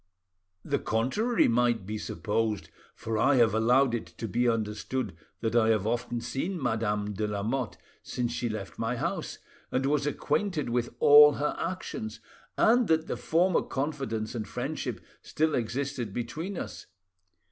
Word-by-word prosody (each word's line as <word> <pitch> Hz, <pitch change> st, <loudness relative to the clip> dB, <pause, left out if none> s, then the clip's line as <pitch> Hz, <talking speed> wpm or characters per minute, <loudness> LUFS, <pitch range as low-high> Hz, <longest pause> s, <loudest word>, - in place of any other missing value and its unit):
The -, -, 0 dB
contrary 170 Hz, -, +1 dB
might 120 Hz, -3 st, +2 dB
be 105 Hz, +2 st, -4 dB
supposed; 110 Hz, -1 st, -2 dB, 0.3 s
for 110 Hz, -1 st, -3 dB
I 135 Hz, +5 st, +4 dB
have 120 Hz, -3 st, +4 dB
allowed 120 Hz, +3 st, +4 dB
it 115 Hz, -7 st, -2 dB
to 85 Hz, +7 st, -7 dB
be 120 Hz, +5 st, +2 dB
understood 110 Hz, -1 st, -2 dB, 0.3 s
that 115 Hz, 0 st, -1 dB
I 110 Hz, -2 st, +4 dB
have 110 Hz, -3 st, +2 dB
often 120 Hz, +1 st, -1 dB
seen 135 Hz, +10 st, -3 dB
Madame 105 Hz, -5 st, -1 dB
de 105 Hz, +2 st, -1 dB
Lamotte 105 Hz, +4 st, -2 dB, 0.2 s
since 120 Hz, -1 st, -2 dB
she 120 Hz, 0 st, -2 dB
left 110 Hz, -3 st, -6 dB
my 115 Hz, +2 st, 0 dB
house, -, -, -3 dB, 0.3 s
and 130 Hz, +1 st, 0 dB
was 145 Hz, +1 st, +1 dB
acquainted 150 Hz, -1 st, -1 dB
with 120 Hz, 0 st, 0 dB
all 150 Hz, 0 st, +9 dB
her 150 Hz, +2 st, -1 dB
actions, 165 Hz, -11 st, -4 dB, 0.4 s
and 240 Hz, 0 st, +4 dB
that 160 Hz, 0 st, +2 dB
the -, -, -3 dB
former 175 Hz, +2 st, +2 dB
confidence 135 Hz, -7 st, -3 dB
and 110 Hz, -3 st, -4 dB
friendship -, -, -4 dB, 0.2 s
still 155 Hz, 0 st, 0 dB
existed 125 Hz, -1 st, -2 dB
between 160 Hz, -, -4 dB
us. -, -, -6 dB
120 Hz, 150 wpm, -28 LUFS, 110-145 Hz, 0.4 s, all